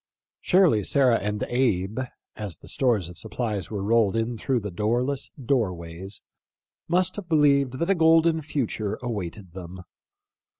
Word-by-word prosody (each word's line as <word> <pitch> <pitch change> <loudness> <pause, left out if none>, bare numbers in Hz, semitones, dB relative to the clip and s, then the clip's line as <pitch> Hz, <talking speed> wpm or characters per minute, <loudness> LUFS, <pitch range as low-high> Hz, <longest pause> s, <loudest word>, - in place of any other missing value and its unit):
Surely 180 - +4
Sarah 130 0 +3
and 105 0 -2
Abe, 110 -4 0 0.4
as 100 -7 -6
the - - -16
stores 115 -9 +1
of 90 - -11
supplies 110 -3 -3
were 100 -3 -3
rolled 110 -1 +3
in 115 +1 -1
through 125 +2 -1
the 105 -1 -5
doorless 120 +9 -1
doorways, 95 - -2 0.6
must 185 +3 +1
have 190 -4 -7
be 160 - +3
lieved 140 -3 +3
that 170 +6 -1
a - - +6
golden 165 -1 +4
future 125 -8 -2
awaited 100 -5 -5
them. 90 0 -9
115 Hz, 145 wpm, -25 LUFS, 100-140 Hz, 0.6 s, a